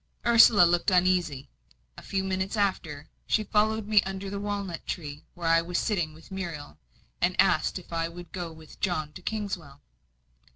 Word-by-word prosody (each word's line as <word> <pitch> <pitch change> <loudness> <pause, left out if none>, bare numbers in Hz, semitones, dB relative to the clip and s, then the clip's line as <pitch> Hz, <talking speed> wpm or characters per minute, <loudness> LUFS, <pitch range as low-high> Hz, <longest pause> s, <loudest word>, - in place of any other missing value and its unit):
Ursula 230 -4 +7
looked 175 +3 +3
uneasy. 180 -7 +2 0.5
A - - -11
few 195 -1 -2
minutes 190 +2 -2
after, 160 -7 -1 0.2
she 215 - +2
followed 215 0 +1
me 210 -2 +5
under 195 0 -5
the 200 - -3
walnut 200 -4 -4
tree, 150 -4 -5
where 175 -2 -4
I 165 0 +5
was 175 +1 -3
sitting 175 -8 -1
with 160 - -16
Muriel, 165 - -6 0.4
and - - +1
asked - - +3
me - - -8
if - - -14
I 165 0 -1
would 175 0 -11
go 175 -3 -5
with 160 -1 -14
John 155 -5 -1
to 185 - -10
Kingswell. 185 -9 -4
180 Hz, 175 wpm, -27 LUFS, 165-200 Hz, 0.5 s, Ursula